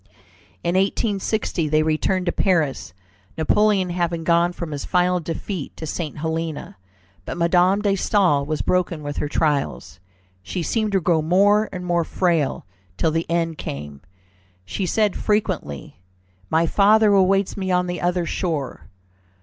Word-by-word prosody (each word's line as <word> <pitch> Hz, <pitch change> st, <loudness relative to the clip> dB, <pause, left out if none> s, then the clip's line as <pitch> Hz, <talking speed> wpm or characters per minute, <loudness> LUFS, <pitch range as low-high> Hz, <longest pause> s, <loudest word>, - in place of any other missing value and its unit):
In 170 Hz, -, 0 dB
1816 195 Hz, -3 st, 0 dB
they 155 Hz, +1 st, +3 dB
returned 170 Hz, +4 st, 0 dB
to 175 Hz, -, +1 dB
Paris, 160 Hz, -, 0 dB, 0.4 s
Napoleon 190 Hz, +3 st, +2 dB
having 170 Hz, -1 st, -1 dB
gone 170 Hz, +1 st, +3 dB
from 170 Hz, -2 st, -6 dB
his 145 Hz, -1 st, -4 dB
final 180 Hz, 0 st, +1 dB
defeat 170 Hz, 0 st, -5 dB
to 160 Hz, -, -6 dB
St. 155 Hz, -1 st, -4 dB
Helena. 160 Hz, 0 st, -4 dB, 0.5 s
But 95 Hz, -, -6 dB
Madame 180 Hz, +4 st, +3 dB
de 205 Hz, -, +2 dB
Staël 185 Hz, -7 st, +2 dB
was 155 Hz, 0 st, -2 dB
broken 175 Hz, -4 st, 0 dB
with 145 Hz, 0 st, -5 dB
her 150 Hz, -, -1 dB
trials. 145 Hz, -10 st, -1 dB, 0.4 s
She 170 Hz, -, -4 dB
seemed 215 Hz, +2 st, -1 dB
to 195 Hz, -, +2 dB
grow 165 Hz, -1 st, +2 dB
more 200 Hz, +6 st, +3 dB
and 180 Hz, -1 st, -6 dB
more 175 Hz, -1 st, +1 dB
frail, 165 Hz, -4 st, 0 dB, 0.3 s
till 160 Hz, -, +1 dB
the 165 Hz, +1 st, -2 dB
end 165 Hz, -2 st, -1 dB
came. 70 Hz, 0 st, -6 dB, 0.6 s
She 185 Hz, -, -3 dB
said 210 Hz, +1 st, +1 dB
frequently, 185 Hz, -, -2 dB, 0.5 s
"My 165 Hz, +1 st, +3 dB
father 210 Hz, +3 st, +4 dB
awaits 195 Hz, 0 st, +3 dB
me 190 Hz, -2 st, -3 dB
on 180 Hz, 0 st, +2 dB
the 175 Hz, -1 st, -4 dB
other 175 Hz, 0 st, 0 dB
shore." 145 Hz, -, -3 dB
175 Hz, 150 wpm, -22 LUFS, 155-190 Hz, 0.6 s, father